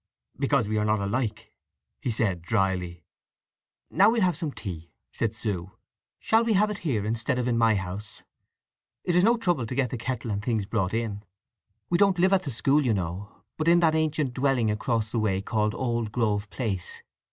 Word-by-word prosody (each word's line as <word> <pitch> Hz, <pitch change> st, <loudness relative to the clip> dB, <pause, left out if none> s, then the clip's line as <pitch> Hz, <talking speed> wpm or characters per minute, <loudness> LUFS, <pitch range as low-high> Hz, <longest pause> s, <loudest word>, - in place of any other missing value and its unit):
"Because 135 Hz, -5 st, +2 dB
we 110 Hz, 0 st, 0 dB
are -, -, +1 dB
not 105 Hz, 0 st, +2 dB
alike," 110 Hz, +2 st, -2 dB, 0.5 s
he -, -, -2 dB
said 105 Hz, -6 st, 0 dB
drily. 90 Hz, -3 st, -1 dB, 0.9 s
"Now 195 Hz, +6 st, +5 dB
we'll 225 Hz, -2 st, +2 dB
have 180 Hz, -3 st, +2 dB
some 160 Hz, -2 st, -3 dB
tea," 85 Hz, -, -7 dB, 0.2 s
said 110 Hz, -1 st, -1 dB
Sue. 95 Hz, -5 st, -4 dB, 0.4 s
"Shall 225 Hz, +1 st, +2 dB
we 230 Hz, -1 st, +1 dB
have 210 Hz, +2 st, +3 dB
it 205 Hz, -, -5 dB
here 120 Hz, -, -1 dB
instead 115 Hz, +4 st, -1 dB
of 125 Hz, -1 st, -1 dB
in 120 Hz, -, +1 dB
my 115 Hz, -1 st, +4 dB
house? 95 Hz, +2 st, -5 dB, 0.8 s
It 175 Hz, -, 0 dB
is 180 Hz, -, +5 dB
no 235 Hz, +3 st, +4 dB
trouble 175 Hz, -, 0 dB
to 125 Hz, -, -5 dB
get 130 Hz, -3 st, 0 dB
the 125 Hz, -, -3 dB
kettle 120 Hz, -1 st, -3 dB
and 100 Hz, 0 st, -2 dB
things 110 Hz, -4 st, 0 dB
brought 100 Hz, -1 st, -1 dB
in. 110 Hz, -3 st, -2 dB, 0.7 s
We 175 Hz, -, +3 dB
don't 195 Hz, -2 st, +4 dB
live 185 Hz, +2 st, +3 dB
at 190 Hz, -, +4 dB
the -, -, -2 dB
school 140 Hz, +6 st, +2 dB
you 120 Hz, -5 st, +2 dB
know, 95 Hz, +2 st, -5 dB
but 155 Hz, -, -2 dB
in 170 Hz, +1 st, +6 dB
that 160 Hz, -2 st, +4 dB
ancient 155 Hz, -4 st, 0 dB
dwelling 130 Hz, -4 st, +1 dB
across 110 Hz, 0 st, -1 dB
the 115 Hz, -, 0 dB
way 100 Hz, -3 st, +1 dB
called 105 Hz, +1 st, -1 dB
Old 120 Hz, -4 st, -1 dB
Grove 105 Hz, -3 st, 0 dB
Place. 100 Hz, -8 st, -4 dB
115 Hz, 195 wpm, -26 LUFS, 105-145 Hz, 0.9 s, in